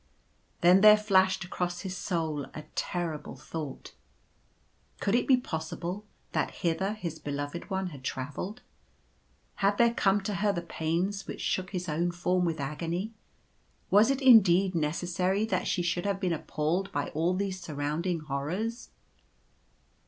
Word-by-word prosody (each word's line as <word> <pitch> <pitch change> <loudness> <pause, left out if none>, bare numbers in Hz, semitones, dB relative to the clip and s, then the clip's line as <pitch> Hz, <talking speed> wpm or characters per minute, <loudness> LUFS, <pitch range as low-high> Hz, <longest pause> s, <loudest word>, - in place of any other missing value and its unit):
Then 180 +2 +6
there 215 0 +9
flashed 190 -3 +3
across 175 0 -3
his 190 -1 -5
soul 160 -7 -2
a 155 - -6
terrible 170 -6 -3
thought 140 +1 -7 0.5
— - - -39
Could 200 - 0
it 240 - +2
be 260 - +6
possible 175 0 -4 0.2
that - - 0 0.2
hither 190 +5 +1
his 170 -7 -5
Beloved 145 +5 -4
One 190 -1 -1
had 140 -4 -11
travelled? 145 - -4 0.9
Had 200 0 +2
there 235 0 +4
come 200 -3 +3
to 205 +2 -3
her 200 +1 +2
the 175 -3 -3
pains 170 +5 -2
which - - -6
shook 185 -1 -1
his 180 -2 -4
own 170 +3 0
form 180 +1 0
with 165 -2 -1
agony? 170 +9 -3 0.8
Was 210 +4 +6
it 275 0 0
indeed 195 -7 +7
neces 165 +2 -1
sary 185 +4 +1
that 220 - -1
she 180 - 0
should 175 +2 -1
have 200 -1 0
been 185 -3 0
appalled 165 +5 -1
by 145 -4 -2
all 165 +4 0
these 190 -1 -2
surrounding 155 +3 -2
horrors 160 - -3
180 Hz, 150 wpm, -29 LUFS, 160-195 Hz, 0.9 s, there